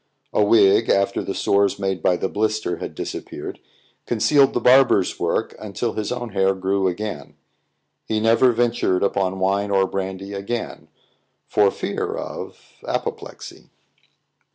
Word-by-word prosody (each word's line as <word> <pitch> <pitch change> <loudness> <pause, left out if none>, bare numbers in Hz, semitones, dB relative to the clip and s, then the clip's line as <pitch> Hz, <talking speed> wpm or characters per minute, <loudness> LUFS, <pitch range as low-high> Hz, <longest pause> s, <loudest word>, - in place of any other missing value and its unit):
A 105 - +3
wig, 105 +1 +4
after 100 0 +2
the - - -4
sores 100 0 +2
made 95 -3 -2
by 90 - +2
the 95 - -1
blister 110 -4 -1
had - - -7
disappeared, - - -6 0.5
concealed 135 +4 +3
the - - +2
barber's 125 -6 +4
work - - -1
until 110 +2 -3
his 105 +1 -3
own 120 -1 -4
hair 95 -1 +1
grew 95 +1 0
again. 90 -5 -5 0.7
He 110 - 0
never 115 +3 +4
ventured 115 -6 +1
upon 95 -1 0
wine 100 +2 0
or 95 -1 +3
brandy 95 +1 -5
again 100 +4 -5 0.6
for 105 -2 +3
fear - - -3
of - - -8
apoplexy. - - -5
100 Hz, 135 wpm, -22 LUFS, 95-115 Hz, 0.7 s, wig